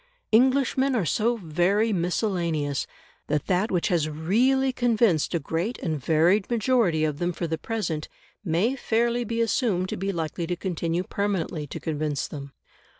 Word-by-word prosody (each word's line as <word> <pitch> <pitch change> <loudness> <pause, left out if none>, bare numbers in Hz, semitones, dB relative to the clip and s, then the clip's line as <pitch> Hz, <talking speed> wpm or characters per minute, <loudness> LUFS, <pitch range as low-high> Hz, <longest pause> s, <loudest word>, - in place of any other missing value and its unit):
Englishmen 265 +2 +3
are 210 -7 +1
so 230 +8 +1
very 195 +5 +1
miscellaneous, 170 - -1 0.4
that 150 -1 0
that 190 +4 +1
which 180 0 0
has 165 -4 +1
REALLY 250 - +2
convinced 225 -10 +2
a - - +1
great 165 - -2
and 155 -5 -3
varied 170 - +3
majority 230 -9 +2
of 150 -1 -1
them 175 0 0
for 175 - -4
the 160 -1 -2
present 190 -9 -3 0.3
may 195 +8 +1
fairly 235 -1 0
be 230 0 -2
assumed 205 -5 +1
to - - -3
be 195 +2 -1
likely 165 -1 -3
to 175 - -1
continue 175 -1 -2
permanently 185 -6 -2
to - - -6
convince 150 -2 -2
them. 140 -2 -8
180 Hz, 155 wpm, -25 LUFS, 160-230 Hz, 0.4 s, Englishmen